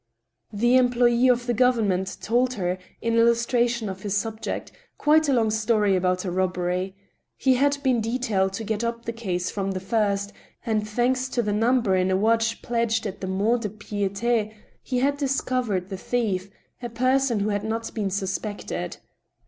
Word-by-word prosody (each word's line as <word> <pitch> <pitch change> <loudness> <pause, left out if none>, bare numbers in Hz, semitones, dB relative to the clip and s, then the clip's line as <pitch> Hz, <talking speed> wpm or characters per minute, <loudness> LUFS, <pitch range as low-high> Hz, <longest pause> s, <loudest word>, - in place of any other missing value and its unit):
The 240 +5 +3
"employ^ 245 0 +4
of 240 0 0
the 240 - 0
government 215 -6 +1
" - - -32
told 250 +3 +1
her, 180 -2 -2 0.2
in 230 0 +2
illustration 235 0 +2
of 190 -1 -6
his 205 -1 -1
subject, 220 +1 -4 0.3
quite 310 0 +3
a - - +3
long 225 -3 +2
story 215 -2 +2
about 185 +1 0
a 180 - -2
robbery. 180 +1 -1 0.4
He 265 - +3
had 280 +3 +2
been 255 -4 +2
detailed 220 -5 0
to 225 - -4
get 220 +1 -2
up 235 0 -3
the 230 - -3
case 185 -6 -3
from 195 -1 -2
the 185 - -3
first, 200 0 0 0.3
and, 215 -2 -1
thanks 255 +4 0
to 240 - 0
the 205 -1 -1
number 225 -2 +2
in 185 0 +2
a 190 - +2
watch 225 +2 +1
pledged 230 -1 0
at 200 -1 -5
the 190 - -3
MonUde^Piiti, 210 +1 -1 0.3
he 255 - -3
had 280 +3 +1
discovered 255 -9 -1
the 190 - -5
thief, 200 -4 -1 0.3
a 240 - -4
person 255 -1 +1
who 210 - 0
had 205 -1 -1
not 225 +1 -2
even - - -20
been - - 0
suspected. 200 +2 -4
225 Hz, 175 wpm, -25 LUFS, 195-240 Hz, 0.4 s, employ^